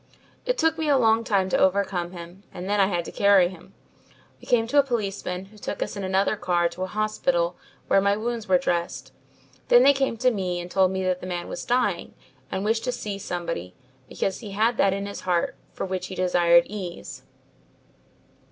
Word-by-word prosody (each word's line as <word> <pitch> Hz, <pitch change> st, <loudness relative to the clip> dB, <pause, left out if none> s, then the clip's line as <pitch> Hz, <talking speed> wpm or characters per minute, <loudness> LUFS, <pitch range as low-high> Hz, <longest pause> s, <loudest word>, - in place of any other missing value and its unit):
"It -, -, +1 dB
took 320 Hz, 0 st, +1 dB
me 315 Hz, -2 st, 0 dB
a 280 Hz, -, +5 dB
long 225 Hz, -2 st, +3 dB
time 195 Hz, -4 st, +1 dB
to -, -, +1 dB
overcome 190 Hz, -2 st, +1 dB
him 175 Hz, +1 st, -10 dB
and 180 Hz, +1 st, -7 dB
then 205 Hz, +1 st, +1 dB
I 195 Hz, -, +5 dB
had 175 Hz, -3 st, -2 dB
to -, -, -7 dB
carry 200 Hz, -3 st, +4 dB
him. 180 Hz, -2 st, -14 dB, 0.6 s
We -, -, -16 dB
came 230 Hz, -2 st, +3 dB
to 285 Hz, +5 st, +3 dB
a -, -, +6 dB
policeman 200 Hz, -7 st, -3 dB
who 210 Hz, +2 st, -17 dB
took -, -, -3 dB
us -, -, -7 dB
in 200 Hz, -, -5 dB
another 190 Hz, +2 st, +1 dB
car 175 Hz, -3 st, +1 dB
to 170 Hz, -, -10 dB
a 185 Hz, -, -1 dB
hospital -, -, 0 dB, 0.3 s
where 195 Hz, -, +3 dB
my 200 Hz, +1 st, +2 dB
wounds 230 Hz, 0 st, -3 dB
were 185 Hz, -1 st, +5 dB
dressed. 175 Hz, -1 st, -2 dB, 0.6 s
Then -, -, +7 dB
they 280 Hz, -, +7 dB
came 270 Hz, -4 st, -1 dB
to 255 Hz, +2 st, +3 dB
me 185 Hz, -5 st, -2 dB
and 175 Hz, 0 st, -7 dB
told 190 Hz, -1 st, +3 dB
me 190 Hz, 0 st, -2 dB
the 185 Hz, 0 st, -1 dB
man 175 Hz, -1 st, -4 dB
was -, -, -6 dB
dying 240 Hz, -8 st, 0 dB, 0.4 s
and 190 Hz, +1 st, -2 dB
wished 225 Hz, +1 st, +1 dB
to 250 Hz, -, 0 dB
see 205 Hz, -4 st, -5 dB
somebody 170 Hz, -, -5 dB, 0.3 s
because 195 Hz, -, -2 dB
he 210 Hz, -4 st, -8 dB
had 225 Hz, +3 st, +1 dB
that 195 Hz, -, +4 dB
in 200 Hz, +1 st, -3 dB
his 200 Hz, -, -7 dB
heart 175 Hz, -2 st, 0 dB, 0.2 s
for -, -, -4 dB
which 185 Hz, -1 st, -3 dB
he 190 Hz, -, -7 dB
desired 175 Hz, -2 st, +4 dB
ease. 190 Hz, -4 st, -7 dB
195 Hz, 205 wpm, -25 LUFS, 180-225 Hz, 0.6 s, Then